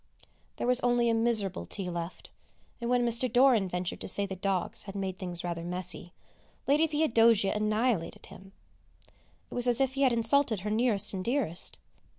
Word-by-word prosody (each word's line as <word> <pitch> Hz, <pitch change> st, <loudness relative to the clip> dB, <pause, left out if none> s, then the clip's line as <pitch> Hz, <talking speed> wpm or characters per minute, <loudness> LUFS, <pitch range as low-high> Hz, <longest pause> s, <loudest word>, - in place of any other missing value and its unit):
There -, -, -4 dB
was 250 Hz, 0 st, +3 dB
only 240 Hz, -1 st, +1 dB
a -, -, +1 dB
miserable 225 Hz, -, +2 dB
tea 185 Hz, -, -5 dB
left, 170 Hz, 0 st, -7 dB, 0.5 s
and, 235 Hz, -, -3 dB
when 245 Hz, -1 st, +2 dB
Mr. 235 Hz, +1 st, +1 dB
Doran 245 Hz, -5 st, +4 dB
ventured 180 Hz, 0 st, -4 dB
to -, -, -5 dB
say 200 Hz, +2 st, +3 dB
the 190 Hz, -1 st, -6 dB
dogs 190 Hz, 0 st, -3 dB
had 200 Hz, 0 st, -9 dB
made 190 Hz, -2 st, -4 dB
things 175 Hz, -2 st, -5 dB
rather 170 Hz, -1 st, -4 dB
messy, 180 Hz, 0 st, -1 dB, 0.6 s
Lady 300 Hz, +4 st, +3 dB
Theodosia 230 Hz, -9 st, +2 dB
annihilated 215 Hz, -4 st, -1 dB
him. 195 Hz, +1 st, -15 dB, 1.0 s
It -, -, -8 dB
was 245 Hz, 0 st, +1 dB
as 245 Hz, 0 st, +3 dB
if 265 Hz, -1 st, +1 dB
he 275 Hz, -, -3 dB
had 265 Hz, -2 st, +4 dB
insulted 230 Hz, -2 st, +2 dB
her 210 Hz, +2 st, -4 dB
nearest 215 Hz, -2 st, +2 dB
and 185 Hz, -1 st, -4 dB
dearest! 235 Hz, -, -2 dB
215 Hz, 175 wpm, -29 LUFS, 185-245 Hz, 1.0 s, Doran